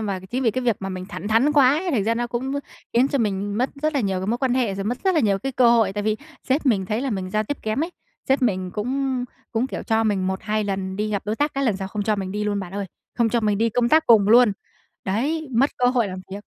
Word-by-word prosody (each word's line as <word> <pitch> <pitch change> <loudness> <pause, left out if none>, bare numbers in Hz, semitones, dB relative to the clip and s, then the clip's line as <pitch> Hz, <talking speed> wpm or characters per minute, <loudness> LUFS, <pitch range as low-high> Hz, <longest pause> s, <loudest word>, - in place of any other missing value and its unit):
mà 200 -3 -3
chính 255 +2 -1
vì 230 - +3
cái 255 +3 -3
việc 235 -4 +2
mà 195 - -4
mình 185 -1 -5
thẳng 205 0 -6
thắn 230 +7 +3
quá 280 -4 +6
ấy, 365 +1 -2
thành 220 -10 +1
ra 230 - +1
nó 240 +1 -1
cũng 245 +3 -3 0.4
khiến 250 +3 +3
cho 280 - 0
mình 205 -2 -1
mất 255 +2 +1
rất 310 0 +1
là 280 - +2
nhiều 195 -4 -1
cái 190 - -4
mối 235 +3 0
quan 255 -1 +1
hệ, 235 -7 +1
rồi 195 0 -4
mất 245 +4 -2
rất 380 - +3
là 320 - +4
nhiều 200 -5 +2
cái 270 +7 -4
cơ 245 -2 +5
hội, 225 -5 +3
tại 205 - -3
vì 215 +1 0 0.3
sếp 280 +2 +1
mình 195 -6 +2
thấy 215 +3 -1
là 270 -1 -2
mình 185 -3 -3
giao 215 +1 +1
tiếp 290 +6 -3
kém 220 +9 0
ấy, 345 - -7 0.4
sếp 270 0 +2
mình 185 -6 0
cũng 255 +5 -2 0.3
cũng, 235 +2 +1
kiểu, - - -5
cho 225 0 +1
mình 195 -3 +1
1-2 210 +3 -1
lần 190 -1 -3
đi 210 +1 -1
gặp 200 -2 -1
đối 215 +2 -1
tác, 295 0 0
các 275 - -1
lần 220 -6 +1
sau 190 0 -5
không 205 +1 -3
cho 210 0 +1
mình 190 -1 -4
đi 210 +1 -2
luôn 205 -1 -1
bạn 185 -1 -8
ơi, 200 -1 -3 0.3
không 235 -2 +2
cho 235 +1 +1
mình 210 -2 +1
đi 230 +1 +2
công 240 +2 +1
tác 315 +4 +4
cùng 210 -3 +6
luôn. 235 -1 +6 0.5
Đấy, 285 +11 -1
mất 260 +4 +3
cơ 250 - +2
hội 245 -3 +2
làm 185 -1 -6
việc. 205 +1 -6
220 Hz, 295 wpm, -23 LUFS, 200-255 Hz, 0.5 s, quá